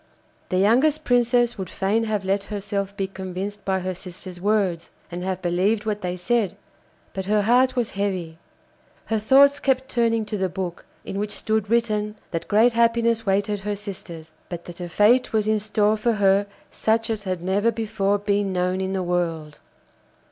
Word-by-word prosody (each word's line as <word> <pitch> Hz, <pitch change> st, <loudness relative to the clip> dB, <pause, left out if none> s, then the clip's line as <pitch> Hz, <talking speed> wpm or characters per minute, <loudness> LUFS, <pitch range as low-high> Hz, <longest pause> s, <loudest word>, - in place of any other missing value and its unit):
The 185 Hz, -, 0 dB
youngest 260 Hz, +10 st, +3 dB
Princess 240 Hz, -2 st, +2 dB
would 185 Hz, -2 st, -4 dB
fain 210 Hz, +4 st, 0 dB
have 210 Hz, -3 st, -2 dB
let 195 Hz, +1 st, 0 dB
herself 200 Hz, -1 st, -4 dB
be 195 Hz, -, 0 dB
convinced 190 Hz, +1 st, -6 dB
by 190 Hz, -1 st, 0 dB
her 185 Hz, +1 st, -2 dB
sisters' 180 Hz, 0 st, -9 dB
words, 195 Hz, -5 st, 0 dB, 0.2 s
and 175 Hz, +1 st, -5 dB
have 185 Hz, -1 st, -3 dB
believed 195 Hz, +5 st, +1 dB
what 210 Hz, -1 st, -2 dB
they 180 Hz, -1 st, -3 dB
said, 200 Hz, +1 st, 0 dB, 0.6 s
but 190 Hz, -1 st, -4 dB
her 210 Hz, +1 st, +2 dB
heart 250 Hz, +4 st, +3 dB
was 240 Hz, -3 st, -1 dB
heavy. 185 Hz, -5 st, -3 dB, 0.7 s
Her 220 Hz, -1 st, 0 dB
thoughts 275 Hz, +6 st, +5 dB
kept 265 Hz, -1 st, 0 dB
turning 230 Hz, -2 st, +1 dB
to 210 Hz, -1 st, -4 dB
the 190 Hz, -1 st, 0 dB
book, 180 Hz, -1 st, -5 dB, 0.2 s
in 195 Hz, -, -4 dB
which 210 Hz, 0 st, -2 dB
stood 220 Hz, -2 st, -1 dB
written 215 Hz, -2 st, +1 dB, 0.2 s
that 165 Hz, -, -3 dB
great 225 Hz, +4 st, +4 dB
happiness 230 Hz, -1 st, +2 dB
waited 200 Hz, +1 st, +1 dB
her 205 Hz, +1 st, -3 dB
sisters, 175 Hz, -6 st, -8 dB, 0.2 s
but 170 Hz, -1 st, -6 dB
that 175 Hz, 0 st, -9 dB
a 175 Hz, -, -5 dB
fate 225 Hz, +8 st, +3 dB
was 215 Hz, -1 st, +1 dB
in 215 Hz, 0 st, +2 dB
store 215 Hz, 0 st, +1 dB
for 230 Hz, +2 st, +1 dB
her 200 Hz, -1 st, +3 dB, 0.2 s
such 225 Hz, +1 st, 0 dB
as 210 Hz, -2 st, -4 dB
had 185 Hz, -2 st, -3 dB
never 200 Hz, +5 st, +2 dB
before 205 Hz, -3 st, 0 dB
been 200 Hz, -1 st, 0 dB
known 180 Hz, +1 st, 0 dB
in 190 Hz, 0 st, -2 dB
the 190 Hz, -1 st, -1 dB
world. 165 Hz, -4 st, -2 dB
205 Hz, 180 wpm, -23 LUFS, 185-225 Hz, 0.7 s, thoughts